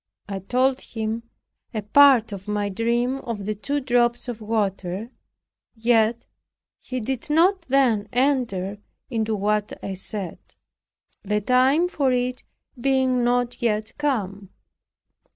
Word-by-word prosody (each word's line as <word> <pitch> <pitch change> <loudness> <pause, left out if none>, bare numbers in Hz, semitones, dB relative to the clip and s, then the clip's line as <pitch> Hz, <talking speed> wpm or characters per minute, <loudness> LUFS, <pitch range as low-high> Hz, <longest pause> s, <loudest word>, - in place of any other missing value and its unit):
I 195 -1 -4
told 255 +7 +1
him 225 +1 -4 0.5
a 215 - -2
part 250 0 +6
of 195 -1 -8
my 205 -1 -1
dream 235 +5 0
of 225 -6 -5
the 215 - -1
two 280 +8 -2
drops 240 -2 +1
of 235 -2 -5
water; 205 -1 -2 0.6
yet, 230 0 +2 0.5
he 255 -1 -5
did 250 +3 -4
not 350 +5 +4
then 240 -6 +3
enter 235 -7 0 0.3
into 220 -2 0
what 210 +1 0
I 195 - -3
said, 190 -1 -5 0.8
the 210 +1 0
time 260 - +3
for 280 -7 0
it 250 0 -1 0.4
being 260 -1 +2
not 245 +1 0
yet 215 -2 -1
come. 200 -9 -2
230 Hz, 125 wpm, -23 LUFS, 210-255 Hz, 0.8 s, part